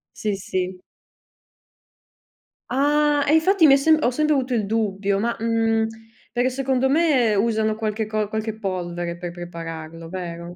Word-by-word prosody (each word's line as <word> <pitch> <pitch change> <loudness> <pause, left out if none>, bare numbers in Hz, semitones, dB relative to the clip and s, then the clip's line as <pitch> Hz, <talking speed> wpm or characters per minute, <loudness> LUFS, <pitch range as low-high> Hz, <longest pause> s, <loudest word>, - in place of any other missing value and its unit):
Sì, 210 -2 -2
sì. 185 -1 -3 1.9
Ah, 290 +2 +2
e 300 - +4
infatti 345 +1 +5
mi 275 - +7
è - - +6
sem 310 +3 +4
ho 245 - +3
sempre 305 +4 +1
avuto 260 -2 0
il 215 -3 0
dubbio. 200 -2 0
Ma 235 +2 -1
mhmm, 225 -1 +1 0.5
perché 245 +2 +1
secondo 265 0 0
me 275 -8 +3
usano 220 0 +1
qualche 215 0 -2
co 215 -1 -1
qualche 220 +1 -4
polvere 175 -4 -4
per 175 0 -6
prepararlo, 165 -1 -8
vero? 175 -1 -6
220 Hz, 150 wpm, -22 LUFS, 185-265 Hz, 1.9 s, mi